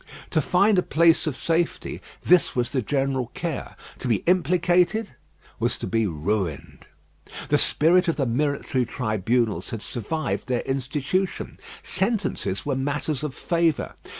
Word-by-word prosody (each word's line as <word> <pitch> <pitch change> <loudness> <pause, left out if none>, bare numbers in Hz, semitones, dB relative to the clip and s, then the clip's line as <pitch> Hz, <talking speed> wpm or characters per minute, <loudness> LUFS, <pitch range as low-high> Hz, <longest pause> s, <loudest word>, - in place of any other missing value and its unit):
To 160 - +3
find 190 +6 +3
a - - +3
place 165 0 +3
of 145 - -2
safety, 165 0 -1 0.2
this 180 -1 +4
was 120 -1 0
the 130 - 0
general 135 0 0
care. 165 -5 -4 0.2
To - - -4
be 115 -4 +1
implicated 180 +4 +2 0.5
was - - 0
to - - -5
be 115 -2 +1
ruined. 85 0 -3 0.6
The - - +4
spirit 180 +4 +3
of 165 - +2
the 140 - 0
military 130 0 0
tribunals 115 -1 0
had 115 -2 -5
survived 155 +7 -3
their 125 -2 0
institution. 140 +8 -2 0.2
Sentences 190 - -1
were 140 -2 0
matters 145 +1 -1
of 150 -3 -4
favour. 170 -3 0
145 Hz, 140 wpm, -24 LUFS, 120-170 Hz, 0.6 s, this